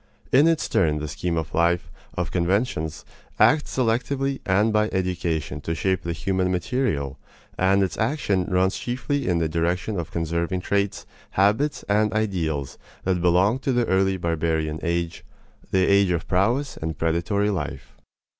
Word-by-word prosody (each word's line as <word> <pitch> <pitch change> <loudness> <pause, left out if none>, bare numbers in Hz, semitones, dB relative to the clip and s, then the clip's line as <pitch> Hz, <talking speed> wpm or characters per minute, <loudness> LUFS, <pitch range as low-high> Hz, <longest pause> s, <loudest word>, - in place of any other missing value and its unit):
In 140 +5 +6
its 165 -2 +1
turn 80 -5 +2
the 75 0 -4
scheme 85 +2 -2
of 80 - -3
life, 85 -2 +1 0.2
of - - -2
conventions, 85 -3 -1 0.3
acts 150 -2 +3
selectively 130 +3 0
and 105 +4 +3
by 105 0 +2
education 85 -6 -2
to 80 +3 -3
shape 95 +4 0
the 85 - -3
human 90 +3 0
material, 90 - -1 0.4
and 95 +1 +3
its 90 -5 -3
action 110 - 0
runs 95 +1 +1
chiefly 130 +3 -2
in 90 -2 +2
the 80 -1 +1
direction 85 +5 -1
of 85 - -4
conserving 85 +2 -2
traits, 100 +1 -1 0.3
habits, 105 +10 +2
and 105 +1 +2
ideals 85 -10 -2 0.2
that 90 -2 0
belong 90 +7 +3
to 135 - -1
the 120 -1 +2
early 95 -1 +2
barbarian 80 -2 -1
age 85 0 -2 0.5
the 95 -1 +3
age 100 -1 +4
of 85 -2 -1
prowess 120 +10 +1
and 80 0 -4
predatory 85 +6 0
life. 95 - -5
95 Hz, 155 wpm, -24 LUFS, 85-105 Hz, 0.5 s, In